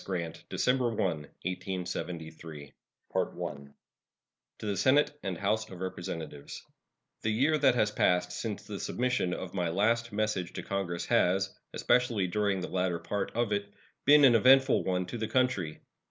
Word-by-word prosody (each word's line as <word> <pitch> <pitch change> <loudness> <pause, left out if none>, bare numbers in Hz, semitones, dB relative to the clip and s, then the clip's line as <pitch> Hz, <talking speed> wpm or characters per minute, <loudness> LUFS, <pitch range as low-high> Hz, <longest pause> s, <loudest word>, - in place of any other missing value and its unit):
Grant 85 -4 -4
December 125 -1 +1
1, 115 - -5
1873 85 -2 -4 0.4
To - - -2 1.1
the 105 -2 -2
Senate 140 +7 +4
and 95 -3 -3
House 110 +3 0
of 95 - -10
Representatives: 85 -5 -6 0.6
The 110 - 0
year 135 +9 +2
that 135 -3 +4
has 105 -3 +2
passed 90 -3 +2
since 105 +2 -4
the 100 -2 -7
submission 125 -7 0
of 90 0 -5
my 90 -3 0
last 115 +6 +1
message 105 -4 -1
to - - -5
Congress 95 -3 -3
has, 95 +2 +2 0.2
especially 120 -6 +2
during 100 +1 0
the 90 - -3
latter 90 -2 0
part 100 +4 -3
of 120 -2 0
it, 100 0 -1 0.3
been 145 0 +8
an 125 - +7
eventful 130 +3 +5
one 90 -1 0
to 115 +6 -6
the 110 - -1
country. 110 -10 0
100 Hz, 150 wpm, -30 LUFS, 90-115 Hz, 1.1 s, been